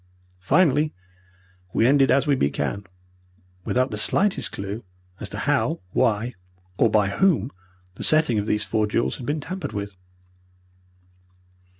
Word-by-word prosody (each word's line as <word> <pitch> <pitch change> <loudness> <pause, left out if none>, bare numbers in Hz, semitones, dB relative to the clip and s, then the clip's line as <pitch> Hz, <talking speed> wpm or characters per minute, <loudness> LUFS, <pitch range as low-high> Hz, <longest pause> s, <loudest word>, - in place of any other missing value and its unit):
Finally, 150 - +2 0.8
we 115 - +2
ended 135 +1 +4
as 140 +1 +3
we 145 - +2
began, 75 - -1 0.8
without 130 +6 0
the 105 - -2
slightest 195 - +2
clue 100 +4 -6 0.4
as - - -5
to - - -7
how, - - 0
why, 115 +5 +1 0.5
or 115 - +4
by 105 -2 +2
whom 140 - +1 0.4
the - - -8
setting 155 -8 +3
of 105 - -3
these 105 0 +1
four 110 -1 0
jewels 115 +3 -1
had 125 - -8
been 150 +2 -1
tampered 165 0 -6
with. 100 -1 -5
120 Hz, 135 wpm, -23 LUFS, 105-145 Hz, 0.8 s, ended